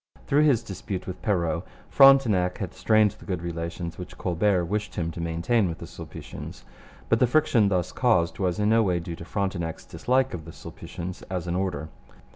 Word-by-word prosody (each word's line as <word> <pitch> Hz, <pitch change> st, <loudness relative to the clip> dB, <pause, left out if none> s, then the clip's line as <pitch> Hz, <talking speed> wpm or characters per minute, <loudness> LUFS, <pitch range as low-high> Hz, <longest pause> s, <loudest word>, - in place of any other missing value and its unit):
Through 150 Hz, +2 st, +3 dB
his 125 Hz, -6 st, +3 dB
dispute 95 Hz, -2 st, -5 dB
with 95 Hz, -, -7 dB
Perrot, 85 Hz, -5 st, 0 dB, 0.3 s
Frontenac 120 Hz, -10 st, +5 dB
had 95 Hz, -, -5 dB
strained 110 Hz, -2 st, +3 dB
the -, -, -16 dB
good 90 Hz, -3 st, -3 dB
relations 85 Hz, 0 st, -5 dB
which 90 Hz, -, -8 dB
Colbert 90 Hz, 0 st, +1 dB
wished 105 Hz, +4 st, -3 dB
him 85 Hz, -1 st, -2 dB
to 85 Hz, -, -6 dB
maintain 85 Hz, +6 st, +1 dB
with 80 Hz, -, -5 dB
the -, -, -8 dB
Sulpicians. -, -, -9 dB, 0.4 s
But -, -, +3 dB
the 125 Hz, -, +4 dB
friction 120 Hz, -6 st, +3 dB
thus 90 Hz, -3 st, 0 dB
caused 85 Hz, -10 st, +2 dB
was 90 Hz, -3 st, 0 dB
in 105 Hz, 0 st, +2 dB
no 115 Hz, +1 st, +5 dB
way 90 Hz, -5 st, +1 dB
due 85 Hz, 0 st, -6 dB
to 85 Hz, -, -10 dB
Frontenac's 95 Hz, -5 st, -3 dB
dislike 130 Hz, +1 st, 0 dB
of 80 Hz, -3 st, -6 dB
the 80 Hz, -, -10 dB
Sulpicians 90 Hz, +2 st, -8 dB
as 90 Hz, -2 st, -3 dB
an 85 Hz, -, -2 dB
order. 90 Hz, -4 st, -2 dB
95 Hz, 190 wpm, -26 LUFS, 85-110 Hz, 0.4 s, Frontenac